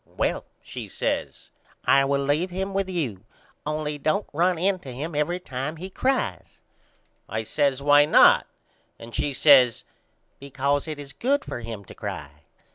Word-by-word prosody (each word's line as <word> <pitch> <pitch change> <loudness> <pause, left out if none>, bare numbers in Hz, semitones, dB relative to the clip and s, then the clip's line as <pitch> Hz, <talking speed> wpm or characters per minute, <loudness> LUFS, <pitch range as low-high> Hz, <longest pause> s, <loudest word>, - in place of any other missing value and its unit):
Well, - - 0 0.2
she - - -7
says, - - -3 0.3
I 135 0 +5
will 140 0 0
leave 150 +6 0
him 190 +2 -4
with 195 -1 -1
you 130 - -3 0.4
only 150 -1 -3
don't 155 +8 0
run 175 +3 +2
in 185 +2 +1
to 135 -7 -9
him 150 +7 -5
every 150 +5 0
time 135 -2 -5
he 185 +4 -8
cries. 95 - -2 0.7
I 110 +2 -2
says 140 +3 0
Why 145 0 +6
not? 150 - +6 0.5
And 115 0 -12
she 145 - -1
says 130 -4 +5 0.6
Because 140 +2 -1
it 155 -1 -5
is 140 -2 -9
good 280 - 0
for - - -5
him 115 -3 -7
to - - -12
cry. 70 -1 -6
145 Hz, 160 wpm, -25 LUFS, 130-175 Hz, 0.7 s, Why